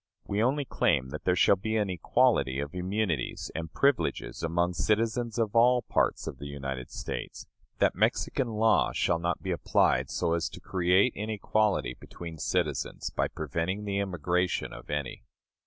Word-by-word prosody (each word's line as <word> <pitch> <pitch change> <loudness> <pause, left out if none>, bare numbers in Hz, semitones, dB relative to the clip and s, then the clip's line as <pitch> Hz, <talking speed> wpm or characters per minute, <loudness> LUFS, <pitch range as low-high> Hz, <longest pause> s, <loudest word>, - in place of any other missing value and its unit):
We 100 +1 -1
only 135 +4 +1
claim 65 - +1
that 75 +2 -7
there 90 - +3
shall 95 +2 +5
be 110 +4 -1
an 105 -3 0
equality 65 -6 +2
of 70 +1 -4
immunities 90 - -2
and 80 -1 -5
privileges 140 +6 0
among 85 +2 0
citizens 115 +6 0
of 115 -1 0
all 125 +1 +5
parts - - 0
of 65 - -6
the 70 - -6
United 70 -3 -5
States; - - -6 0.3
that - - +3
Mexican 130 - +1
law 110 -1 +2
shall 85 - +1
not 85 +1 -2
be 95 - -2
applied 85 - +2
so 85 - 0
as 85 -1 0
to - - -10
create 95 +5 +2
inequality 105 - 0
between 85 -2 -9
citizens, 75 -5 -1
by - - 0
preventing 85 +7 -3
the 100 -1 -1
immigration 90 -1 -1
of - - -11
any. 75 -2 -3
90 Hz, 160 wpm, -29 LUFS, 80-110 Hz, 0.3 s, shall